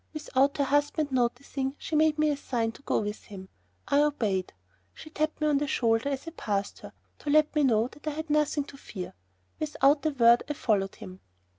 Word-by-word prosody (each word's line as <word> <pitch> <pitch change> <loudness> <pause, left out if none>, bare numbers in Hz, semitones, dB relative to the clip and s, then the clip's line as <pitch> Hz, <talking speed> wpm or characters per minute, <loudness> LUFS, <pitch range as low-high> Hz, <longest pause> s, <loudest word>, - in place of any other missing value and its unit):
Without 280 -2 +1
her 285 - +2
husband 290 +1 +1
noticing 265 +2 -1
she 315 - -4
made 310 0 +3
me 305 0 +3
a - - 0
sign 235 -5 -2
to 230 - -16
go - - 0
with 210 0 -5
him. 190 -2 -10 0.4
I 285 - +4
obeyed. 215 -11 0 0.4
She 310 - -12
tapped 310 0 -2
me 305 - 0
on 295 -2 +3
the 295 - -1
shoulder 230 0 +1
as 275 +3 -4
I - - -4
passed 200 -10 -3
her, - - -11 0.3
to 295 - -5
let 305 +1 +4
me 300 -1 +2
know 230 -3 +3
that 295 - -14
I - - +1
had 315 +1 -5
nothing 300 -1 +2
to 280 0 -13
fear. 190 -9 -8 0.5
Without 295 -1 +2
a 310 - +2
word 240 -4 +5
I - - 0
followed 205 -8 0
him. 190 -4 -10
280 Hz, 210 wpm, -28 LUFS, 230-300 Hz, 0.5 s, word